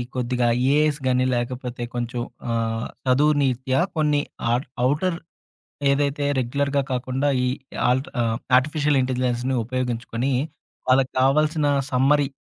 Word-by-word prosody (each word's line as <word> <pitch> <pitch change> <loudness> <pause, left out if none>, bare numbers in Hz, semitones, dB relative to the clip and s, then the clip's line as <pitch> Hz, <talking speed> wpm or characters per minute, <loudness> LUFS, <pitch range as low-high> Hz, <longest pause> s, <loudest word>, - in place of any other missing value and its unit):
కొద్దిగా 125 -1 0 0.3
ఏఐస్ 150 0 +2
గాని, 125 0 +2
లేకపోతే 120 0 -4
కొంచెం 120 0 -3 0.3
ఆహ్, 115 0 -1 0.2
చదువు 145 +4 +4
నీత్యా 130 0 +1 0.2
కొన్ని 150 -2 +2 0.3
ఆట్ 125 +3 -1 0.2
అవుటర్ 160 +7 +1 0.7
ఏదైతే 145 +1 0
రెగ్యులర్‌గా 140 +3 0
కాకుండా 130 +2 -1 0.2
ఈ - - +1 0.4
ఆల్ట్ 130 +7 0
ఆహ్, 115 0 0 0.2
ఆర్టిఫిషియల్ 150 +1 +1
ఇంటెలిజెన్స్‌ని 125 0 -1
ఉపయోగించుకొని 125 +1 -2 0.6
వాళ్ళకి 130 0 +3
కావాల్సిన 150 +3 +2 0.3
సమ్మరి, 140 +2 +3
130 Hz, 110 wpm, -23 LUFS, 125-145 Hz, 0.7 s, చదువు